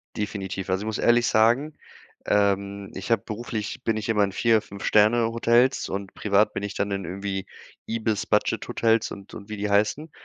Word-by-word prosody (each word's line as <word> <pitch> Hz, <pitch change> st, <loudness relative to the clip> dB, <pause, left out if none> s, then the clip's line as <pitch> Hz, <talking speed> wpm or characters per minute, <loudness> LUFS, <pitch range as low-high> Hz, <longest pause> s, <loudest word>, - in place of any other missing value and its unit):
Definitiv. 95 Hz, -3 st, -4 dB
Also 95 Hz, +2 st, 0 dB
ich -, -, -6 dB
muss 110 Hz, -1 st, -2 dB
ehrlich 120 Hz, 0 st, +3 dB
sagen, 120 Hz, +8 st, +3 dB, 0.5 s
ähm, 100 Hz, -1 st, 0 dB
ich 100 Hz, +5 st, -5 dB
habe 110 Hz, -4 st, +3 dB
beruflich 110 Hz, -1 st, -5 dB
bin 110 Hz, -1 st, 0 dB
ich 110 Hz, +1 st, -4 dB
immer 105 Hz, -2 st, +3 dB
in 100 Hz, -, 0 dB
4, 110 Hz, +1 st, +3 dB
5 100 Hz, 0 st, -10 dB
Sterne-Hotels 115 Hz, +3 st, +3 dB
und 100 Hz, 0 st, -5 dB
privat 105 Hz, +1 st, +2 dB
bin -, -, -4 dB
ich 100 Hz, -, -4 dB
dann 100 Hz, 0 st, -2 dB
in 100 Hz, -2 st, -3 dB
irgendwie 95 Hz, +1 st, -4 dB, 0.4 s
IBIS-Budget-Hotels 115 Hz, 0 st, 0 dB
und 100 Hz, 0 st, -10 dB
und 105 Hz, 0 st, -10 dB
wie 105 Hz, -, -5 dB
die 105 Hz, 0 st, -2 dB
heißen. 110 Hz, +10 st, +1 dB
105 Hz, 175 wpm, -25 LUFS, 100-115 Hz, 0.5 s, ehrlich